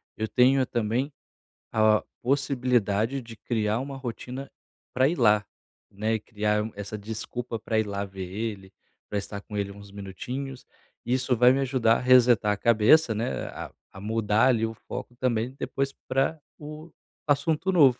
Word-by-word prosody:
eu 110 Hz, -, -2 dB
tenho 130 Hz, +3 st, +4 dB
também 120 Hz, +4 st, -1 dB, 0.6 s
a 110 Hz, -1 st, +4 dB, 0.2 s
possibilidade 125 Hz, -3 st, +1 dB
de 115 Hz, -1 st, -11 dB
criar 110 Hz, -1 st, 0 dB
uma 135 Hz, +1 st, -5 dB
rotina 130 Hz, +1 st, -6 dB, 0.4 s
para 130 Hz, +1 st, +4 dB
ir 170 Hz, -, -1 dB
lá, 105 Hz, -4 st, +4 dB, 0.5 s
né, 110 Hz, +3 st, 0 dB
criar 105 Hz, 0 st, -1 dB
essa 105 Hz, +1 st, -5 dB
desculpa 110 Hz, +2 st, -5 dB
para 110 Hz, 0 st, 0 dB
ir 110 Hz, -, +1 dB
lá 100 Hz, 0 st, -2 dB
ver 95 Hz, -1 st, -7 dB
ele, 100 Hz, -1 st, -5 dB, 0.4 s
para 105 Hz, -, -2 dB
estar 100 Hz, 0 st, -5 dB
com 105 Hz, 0 st, -7 dB
ele 100 Hz, -1 st, -2 dB
uns 100 Hz, 0 st, -12 dB
minutinhos 125 Hz, +7 st, -6 dB, 0.4 s
e 120 Hz, -, 0 dB
isso 130 Hz, 0 st, +1 dB
vai 125 Hz, +2 st, +7 dB
me 135 Hz, -, +2 dB
ajudar 125 Hz, -4 st, +3 dB
a -, -, -4 dB
resetar 125 Hz, -4 st, +5 dB
a 105 Hz, -, 0 dB
cabeça, 115 Hz, +6 st, +5 dB
né. 115 Hz, +4 st, -2 dB
A -, -, -7 dB, 0.2 s
a -, -, -8 dB
mudar 110 Hz, +2 st, +2 dB
ali 115 Hz, -4 st, +3 dB
o 115 Hz, -, -4 dB
foco 120 Hz, +2 st, -8 dB
também 120 Hz, -1 st, 0 dB
depois 135 Hz, 0 st, -2 dB, 0.2 s
para 135 Hz, +4 st, +1 dB, 0.2 s
o 155 Hz, +2 st, -9 dB, 0.4 s
assunto 150 Hz, +5 st, +2 dB
novo. 140 Hz, -9 st, +5 dB
115 Hz, 165 wpm, -27 LUFS, 105-130 Hz, 0.6 s, vai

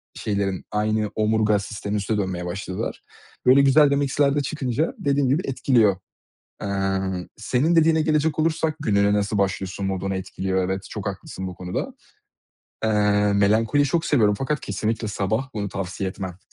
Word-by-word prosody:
şeylerin, 100 Hz, -3 st, -2 dB
aynı 105 Hz, 0 st, 0 dB
omurga 110 Hz, -1 st, +2 dB
sisteminin 100 Hz, 0 st, -4 dB
üstüne 105 Hz, +2 st, -1 dB
dönmeye 95 Hz, -3 st, -2 dB
başladılar. 95 Hz, +1 st, -4 dB, 0.4 s
Böyle 130 Hz, +2 st, +7 dB
güzel 140 Hz, +1 st, +5 dB
de -, -, +3 dB
mix'ler 140 Hz, 0 st, +1 dB
de 145 Hz, -, +2 dB
çıkınca 140 Hz, +1 st, -2 dB
dediğim 140 Hz, -2 st, +1 dB
gibi 145 Hz, +7 st, +2 dB
etkiliyor. 120 Hz, -6 st, +3 dB, 0.7 s
Emm, 95 Hz, -2 st, -1 dB
senin 130 Hz, +9 st, +1 dB
dediğine 160 Hz, -1 st, +4 dB
gelecek 155 Hz, 0 st, +1 dB
olursak, 155 Hz, -1 st, +1 dB
gününe 100 Hz, -5 st, +2 dB
nasıl 105 Hz, 0 st, 0 dB
başlıyorsun, 95 Hz, 0 st, -1 dB
modunu 95 Hz, 0 st, -2 dB
etkiliyor, 95 Hz, 0 st, -2 dB
evet, 95 Hz, +1 st, -3 dB
çok 105 Hz, -1 st, -6 dB
haklısın 95 Hz, -1 st, -5 dB
bu 90 Hz, -, -6 dB
konuda. 90 Hz, +1 st, -4 dB, 0.9 s
Eee, 110 Hz, -, +2 dB, 0.4 s
melankoliyi 110 Hz, +8 st, +3 dB
çok 165 Hz, +4 st, 0 dB
seviyorum 110 Hz, -10 st, +3 dB
fakat 145 Hz, +2 st, -1 dB
kesinlikle 110 Hz, +2 st, -2 dB
sabah, 110 Hz, +6 st, -1 dB
bunu 100 Hz, -2 st, -2 dB
tavsiye 95 Hz, 0 st, -4 dB
etmem. 95 Hz, -2 st, -7 dB
105 Hz, 150 wpm, -23 LUFS, 95-140 Hz, 0.9 s, Böyle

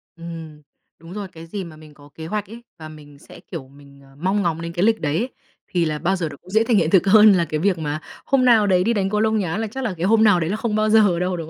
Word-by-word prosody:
Ừm. 165 Hz, -3 st, -9 dB, 0.4 s
Đúng 165 Hz, +2 st, -12 dB
rồi, 205 Hz, -1 st, -5 dB
cái 165 Hz, -2 st, -12 dB
gì 195 Hz, +4 st, -6 dB
mà 165 Hz, -3 st, -11 dB
mình 155 Hz, -1 st, -15 dB
có 145 Hz, 0 st, -18 dB
kế 160 Hz, -, -8 dB
hoạch 210 Hz, +3 st, -3 dB
ấy, 235 Hz, +2 st, -11 dB, 0.2 s
và 155 Hz, -1 st, -9 dB
mình 145 Hz, -2 st, -14 dB
sẽ, -, -, -15 dB
kiểu, 165 Hz, -6 st, -9 dB
mình, 140 Hz, 0 st, -18 dB
ờ, 135 Hz, 0 st, -20 dB
mong 190 Hz, +7 st, -1 dB
ngóng 165 Hz, -3 st, -1 dB
đến 170 Hz, 0 st, -6 dB
cái 175 Hz, +1 st, -1 dB
lịch 225 Hz, 0 st, +2 dB
đấy 150 Hz, 0 st, -1 dB
ấy, 240 Hz, +7 st, -2 dB, 0.4 s
thì 175 Hz, -2 st, 0 dB
là 155 Hz, -1 st, -2 dB
bao 175 Hz, +5 st, 0 dB
giờ 170 Hz, -4 st, -3 dB
nó 140 Hz, -, -11 dB
cũng 180 Hz, -, -19 dB
dễ 220 Hz, +3 st, +2 dB
thành 230 Hz, -1 st, +2 dB
hiện 165 Hz, -4 st, +2 dB
thực 190 Hz, +1 st, +4 dB
hơn 210 Hz, +1 st, +7 dB
là 175 Hz, -3 st, +2 dB
cái 155 Hz, -2 st, -3 dB
việc 190 Hz, +1 st, +1 dB
mà, 150 Hz, -1 st, -3 dB, 0.3 s
"hôm 265 Hz, -2 st, +2 dB
nào 225 Hz, -4 st, +5 dB
đấy 180 Hz, -2 st, +3 dB
đi 230 Hz, +4 st, +1 dB
đánh 195 Hz, -3 st, 0 dB
cầu 210 Hz, +1 st, -1 dB
lông 220 Hz, 0 st, +1 dB
nhá", 190 Hz, -2 st, -2 dB
là 220 Hz, 0 st, -2 dB
chắc 265 Hz, +5 st, -6 dB
là 220 Hz, -6 st, -2 dB
cái 170 Hz, -, -2 dB
"hôm 220 Hz, +2 st, +4 dB
nào" 205 Hz, -5 st, +5 dB
đấy 160 Hz, -1 st, -2 dB
là 200 Hz, -, -1 dB
không 220 Hz, -1 st, -2 dB
bao 215 Hz, 0 st, +1 dB
giờ 210 Hz, -5 st, +4 dB
đâu, 180 Hz, 0 st, -1 dB
đúng 160 Hz, -2 st, -7 dB
180 Hz, 315 wpm, -21 LUFS, 160-210 Hz, 0.4 s, hơn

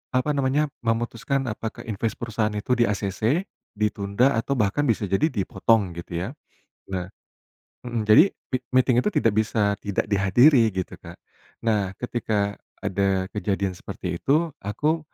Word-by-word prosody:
apa 130 Hz, +4 st, +1 dB
namanya, 145 Hz, +1 st, +1 dB
memutuskan 120 Hz, +2 st, -1 dB
apakah 110 Hz, +1 st, -6 dB
inves 110 Hz, 0 st, -2 dB
perusahaan 110 Hz, -2 st, -2 dB
itu 120 Hz, +4 st, -1 dB
di-ACC, 110 Hz, -, +1 dB, 0.3 s
ditunda, 105 Hz, +4 st, +1 dB
atau 140 Hz, +4 st, -1 dB
bahkan 125 Hz, +5 st, +1 dB
bisa 110 Hz, -2 st, +1 dB
jadi 95 Hz, -, +2 dB
dipotong 105 Hz, -, +1 dB
gitu, 85 Hz, -, -10 dB, 0.2 s
ya. -, -, -5 dB, 0.6 s
Nah 90 Hz, 0 st, -3 dB, 0.7 s
mhm 120 Hz, -3 st, -3 dB
jadi 110 Hz, -, +7 dB
m -, -, -12 dB, 0.2 s
meeting 125 Hz, -1 st, +4 dB
itu -, -, 0 dB
tidak 115 Hz, -, +2 dB
bisa 105 Hz, -1 st, +1 dB
tidak 100 Hz, -2 st, -1 dB
dihadiri 115 Hz, +6 st, +5 dB
gitu 95 Hz, -3 st, -4 dB
Kak. -, -, -11 dB, 0.5 s
Nah, 100 Hz, -4 st, +1 dB
ketika 105 Hz, -4 st, -2 dB, 0.3 s
ada 95 Hz, -1 st, +1 dB
kejadian 100 Hz, -2 st, -1 dB
seperti 90 Hz, -1 st, -6 dB
itu 155 Hz, +3 st, +2 dB
aku, 150 Hz, +11 st, 0 dB
110 Hz, 140 wpm, -24 LUFS, 100-125 Hz, 0.7 s, jadi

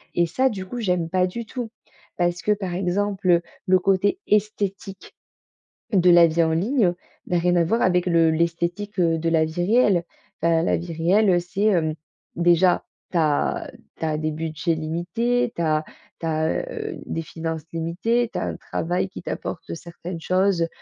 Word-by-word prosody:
et 170 Hz, -, +3 dB
ça, 255 Hz, +11 st, +1 dB
du 190 Hz, -4 st, -5 dB
coup, 240 Hz, +6 st, -6 dB
j'aime 180 Hz, -6 st, 0 dB
pas 185 Hz, 0 st, +2 dB
du 230 Hz, +5 st, -6 dB
tout. 240 Hz, 0 st, -5 dB, 0.5 s
Parce 175 Hz, 0 st, 0 dB
que, 210 Hz, -, +1 dB
par 190 Hz, -4 st, -4 dB
exemple, 190 Hz, +1 st, -1 dB
heu, 170 Hz, -1 st, +5 dB, 0.3 s
le 185 Hz, 0 st, +5 dB
côté 195 Hz, -, +2 dB
esthétique 200 Hz, -2 st, -1 dB, 0.8 s
de 180 Hz, -2 st, +5 dB
la 170 Hz, -1 st, +8 dB
vie 165 Hz, +1 st, +2 dB
en 160 Hz, 0 st, +1 dB
ligne 200 Hz, -, +2 dB, 0.3 s
n'a 175 Hz, -, +1 dB
rien 175 Hz, +1 st, +2 dB
à 170 Hz, -, +3 dB
voir 230 Hz, +8 st, +1 dB
avec 180 Hz, -1 st, +2 dB
le 165 Hz, -2 st, +4 dB
l'esthétique, 170 Hz, +5 st, -1 dB
heu, 165 Hz, -2 st, +3 dB
de 165 Hz, +1 st, 0 dB
la 160 Hz, -1 st, +3 dB
vie 175 Hz, +3 st, -2 dB
réelle. 210 Hz, -2 st, +4 dB, 0.5 s
Heu, -, -, +4 dB, 0.2 s
la -, -, +2 dB
vie 170 Hz, 0 st, -6 dB
réelle, 185 Hz, +6 st, +3 dB
heu, 175 Hz, -1 st, +4 dB
c'est, 180 Hz, +4 st, -4 dB
hem, 170 Hz, -7 st, +2 dB, 0.4 s
déjà, 175 Hz, +1 st, +3 dB, 0.3 s
tu 175 Hz, -, 0 dB
as 150 Hz, -3 st, +1 dB, 0.3 s
tu -, -, -6 dB
as 155 Hz, -1 st, 0 dB
des 155 Hz, 0 st, -1 dB
budgets 160 Hz, +1 st, -2 dB
limités, 230 Hz, +10 st, -1 dB
tu -, -, -3 dB
as 155 Hz, -1 st, +1 dB, 0.4 s
tu -, -, -5 dB
as, 160 Hz, -, 0 dB
heu, 430 Hz, -5 st, -5 dB
des 165 Hz, -, -3 dB
finances 160 Hz, 0 st, -5 dB
limitées, 210 Hz, +9 st, 0 dB
tu -, -, -3 dB
as -, -, -2 dB
un -, -, -4 dB
travail 180 Hz, +3 st, -2 dB
qui -, -, -9 dB
t'apporte 170 Hz, -, -5 dB
certaines 170 Hz, +1 st, -8 dB
choses 185 Hz, -2 st, +2 dB
175 Hz, 185 wpm, -23 LUFS, 165-200 Hz, 0.8 s, la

